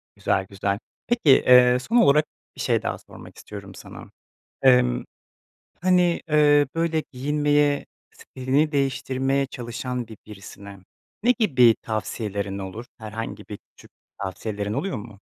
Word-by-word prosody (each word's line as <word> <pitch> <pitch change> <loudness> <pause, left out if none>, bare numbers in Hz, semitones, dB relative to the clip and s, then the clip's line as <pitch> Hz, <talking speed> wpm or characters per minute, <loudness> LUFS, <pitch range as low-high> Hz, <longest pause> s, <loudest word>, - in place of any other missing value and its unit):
Güzel, 95 - 0
güzel. 100 0 -2 0.3
Peki, 235 -10 +1
eee, 125 -1 +6
son 235 - 0
olarak 150 -6 +5 0.3
bir - - -7
şey - - +1
daha - - -3
sormak - - -14
istiyorum 100 -2 -10
sana. - - -12 0.5
Emm, 60 -1 +4 0.8
hani, 180 -1 +3
eee, 145 -1 +4
böyle 165 -1 0
giyinmeye, 145 +1 +1 0.3
stilini 135 +4 -1
değiştirmeye 135 0 0
çalışan 120 0 -5
bir 110 - -10
birisine 100 -1 -11 0.4
ne 245 - +3
gibi 125 - +5
tavsiyelerin 105 -2 -4
olur? 100 +5 -7
Herhangi 110 +1 -7
bir 105 - -7 0.2
küçük - - -17 0.3
tavsiyelerin 100 +2 -4
oluyor 160 - -2
mu? 105 -2 -11
125 Hz, 125 wpm, -24 LUFS, 105-145 Hz, 0.8 s, eee